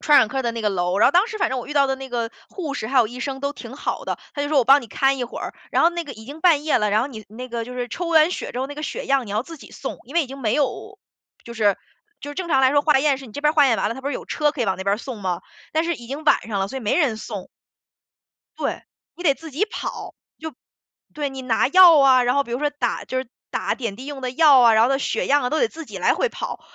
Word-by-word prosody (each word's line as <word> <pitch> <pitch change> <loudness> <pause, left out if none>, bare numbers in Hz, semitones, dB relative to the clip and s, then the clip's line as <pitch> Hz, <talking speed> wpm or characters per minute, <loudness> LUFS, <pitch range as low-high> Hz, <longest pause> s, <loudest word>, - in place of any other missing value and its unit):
传 295 -2 +5
染 225 - +5
科 265 +5 -3
的 240 - -1
那 230 -1 -5
个 210 - +1
楼。 180 0 -1
然 - - +6
后 270 - +3
当 365 +5 +4
时 445 -2 -6
反 410 - 0
正 260 - -1
我 245 - -7
遇 295 - -7
到 280 -1 +4
的 265 - 0
那 265 0 -8
个 235 -2 -2 0.2
护 320 -7 -5
士 220 - -4
还 265 +3 -2
有 235 - +5
医 250 +3 -9
生 270 0 -4
都 280 0 -2
挺 260 -2 -10
好 - - -4
的， - - -2 0.2
他 285 - -5
就 290 - -1
说： 305 - 0
“我 255 - +3
帮 275 +3 +6
你 235 - -10
看 270 +5 +1
一 250 - -2
会 240 - -8
儿。” - - -5 0.2
然 - - +2
后 335 - +5
那 345 0 -3
个 285 -5 -9
已 220 0 -12
经 285 +6 -10
半 315 -5 +4
夜 310 - +2
了， 210 -1 +1
然 215 +2 +3
后 - - -1
你 220 -6 -10
那 245 +4 -8
个 235 -1 -3
就 250 - -8
是 245 -1 -3
抽 345 +8 -4
完 320 0 +5
血 - - -5
之 245 - -4
后 265 - -1
那 290 - -8
个 300 - -7
血 - - -4
样 270 -4 +1
你 - - -8
要 215 +3 0
自 330 +1 -11
己 - - -14
送， 265 - -6
因 275 - -13
为 340 - +4
已 280 - -5
经 270 +2 -9
没 225 -5 0
有 275 -4 -2 0.5
就 235 - -9
是 210 -4 +2 0.5
就 290 - -6
是 - - -8
正 360 0 -4
常 270 -4 +3
来 260 - +5
说 290 - +4
化 300 -2 +3
验 275 -1 +2
是 270 - -10
你 220 - -14
这 285 - -7
边 300 - +4
儿 - - -19
化 295 -3 +6
验 235 -4 +3
完 210 - -1
了， - - -3
它 265 - -8
不 275 - -3
是 - - -3
有 - - -6
车 300 -1 0
可 290 -4 -3
以 - - +1
往 190 -3 -1
那 - - -4
边 200 +1 +2
儿 - - -5
送 235 -1 -7
吗， 185 -3 -2 0.3
但 320 +1 +1
是 340 0 0
已 240 - -11
经 280 +5 -6
晚 - - +4
上 205 -3 -2
了， 195 0 -1
所 265 - -5
以 - - -9
没 215 -3 0
人 265 -10 +1
送。 205 -4 -7 1.1
对， - - -3 0.3
你 350 - -8
得 290 -6 +4
自 325 +3 -11
己 305 +9 0
跑， 435 - -6 0.2
就 315 -2 -7 0.6
对， 295 -1 -2
你 265 -1 -8
拿 245 -1 +1
药 345 0 +8
啊， 260 -2 +6
然 245 +1 +1
后 280 0 +2
比 235 - -8
如 240 - -1
说 295 +1 0
打 275 -5 -2
就 260 - -3
是 260 - -4 0.2
打 - - -1
点 225 -6 -5
滴 260 +4 -9
用 285 -2 -6
的 255 -1 -3
药 280 0 +6
啊， 235 -2 +6
然 220 - +5
后 - - +2
的 270 0 +1
血 - - -1
样 290 +1 +3
啊， 250 - -1
都 315 - 0
得 470 - +2
自 325 0 -9
己 - - -8
来 - - +3
回 - - 0
跑。 - - -6
270 Hz, 355 characters per minute, -22 LUFS, 235-295 Hz, 1.1 s, 药